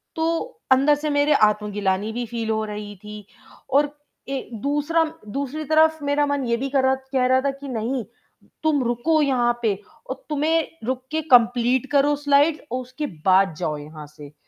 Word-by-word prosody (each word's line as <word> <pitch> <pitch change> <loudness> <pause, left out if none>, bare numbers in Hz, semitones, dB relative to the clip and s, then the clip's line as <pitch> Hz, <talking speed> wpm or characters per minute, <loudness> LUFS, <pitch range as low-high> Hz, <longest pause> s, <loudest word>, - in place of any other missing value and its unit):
तो 335 +9 -2
अंदर 275 +3 +5
से 300 +1 -3
मेरे 290 +1 +3
आत्मग्लानि 210 -3 +1
भी 240 +1 -3
फील 230 -1 -4
हो 220 0 0
रही 210 -1 -7
थी 210 -1 -9 0.4
और 285 +2 +3 0.4
ए, 270 -1 -4
दूसरा 290 +7 0 0.2
दूसरी 280 +7 -4
तरफ़ 315 +1 +3
मेरा 285 +1 +2
मन 285 -2 -1
ये 235 -1 +1
भी 270 +3 -3
कर 270 -1 +1
रहा 265 0 +3
कह 265 -1 -1
रहा 260 0 +3
था 280 +1 0
कि 275 +1 -10
नहीं, 245 +1 -2 0.6
तुम 300 -4 +2
रुको 240 +7 +1
यहाँ 240 -4 +1
पे 210 -4 +1 0.3
और 260 0 -6
तुम्हें 310 +2 +1 0.2
रुक 255 +1 -2
के 315 0 0
कंप्लीट 245 +1 +4
करो 290 +1 +3
स्लाइड 290 +2 +3
और 255 +1 -2
उसके 255 +4 -6 0.2
बाद 190 -1 +4
जाओ 155 -4 -2
यहाँ 150 +1 -10
से। 150 -1 -13
260 Hz, 180 wpm, -23 LUFS, 225-290 Hz, 0.6 s, अंदर